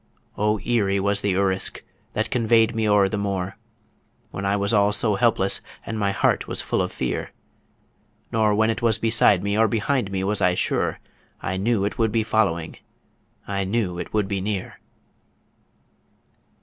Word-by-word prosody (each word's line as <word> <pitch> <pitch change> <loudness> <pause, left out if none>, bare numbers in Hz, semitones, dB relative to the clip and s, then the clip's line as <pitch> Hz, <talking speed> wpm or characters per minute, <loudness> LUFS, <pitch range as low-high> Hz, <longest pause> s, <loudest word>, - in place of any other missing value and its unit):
O 105 +1 +1
eerie 100 -3 0
was 100 +1 +1
the 100 -2 0
Urisk 95 -1 0 0.3
that 110 - -2
convoy'd 115 -2 +3
me 110 -1 0
o'er 100 -1 +4
the 100 +1 -3
moor! 95 -2 -2 0.8
When 95 +1 -4
I 100 - +2
was 100 +1 0
all 100 -1 +4
so 105 +1 0
helpless 100 -2 +2 0.2
and 110 -1 -4
my 100 -1 +1
heart - - +1
was - - -3
full - - -1
of - - -2
fear, - - -3 1.0
Nor 110 -3 +2
when 110 +1 +3
it 110 - -4
was 115 -2 +2
beside 115 -4 +4
me 100 0 0
or 110 +1 +4
behind 115 +1 0
me 95 -1 -2
was 105 +1 -1
I 90 0 +3
sure - - -1 0.4
I 95 - -3
knew 100 0 +1
it 105 - -4
would 110 -1 +2
be 110 +1 +1
following 100 -7 0 0.7
I 100 -1 -1
knew 95 -3 -1
it - - -6
would 105 -2 0
be 100 -1 -2
near! 100 -1 -4
105 Hz, 175 wpm, -23 LUFS, 95-110 Hz, 1.0 s, o'er